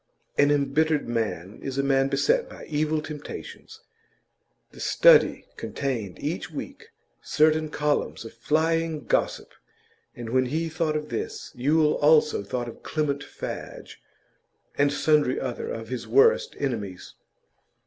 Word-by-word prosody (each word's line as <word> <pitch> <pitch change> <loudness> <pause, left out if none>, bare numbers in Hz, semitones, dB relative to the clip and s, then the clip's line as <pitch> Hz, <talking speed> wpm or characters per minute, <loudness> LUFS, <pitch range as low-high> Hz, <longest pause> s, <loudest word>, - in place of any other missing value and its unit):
An 145 - +4
embittered 145 +2 +1
man 110 -5 -3
is 135 -1 -5
a 140 - +2
man 135 -1 +3
beset 475 - +1
by - - -10
evil 155 0 -1
temptations. 150 -2 -9 0.9
The - - -15
Study - - +5
contained 115 -9 -3
each - - -4
week - - -8 0.3
certain 155 0 +2
columns 150 -5 -1
of 115 - -9
flying 160 +4 0
gossip, - - -1 0.6
and 120 -2 -7
when 130 0 +2
he 160 +5 -1
thought 160 -1 -1
of 150 0 -6
this, 435 -1 -5
Yule 150 +4 +2
also 150 -4 +4
thought 120 +4 -4
of 115 - -10
Clement 145 -2 -2
Fadge, - - -8 0.7
and 145 0 +3
sundry 145 -2 +2
other 125 -3 -4
of 115 0 -6
his 125 -1 -5
worst 460 +3 +4
enemies. 105 -9 -4
145 Hz, 130 wpm, -26 LUFS, 130-155 Hz, 0.9 s, Study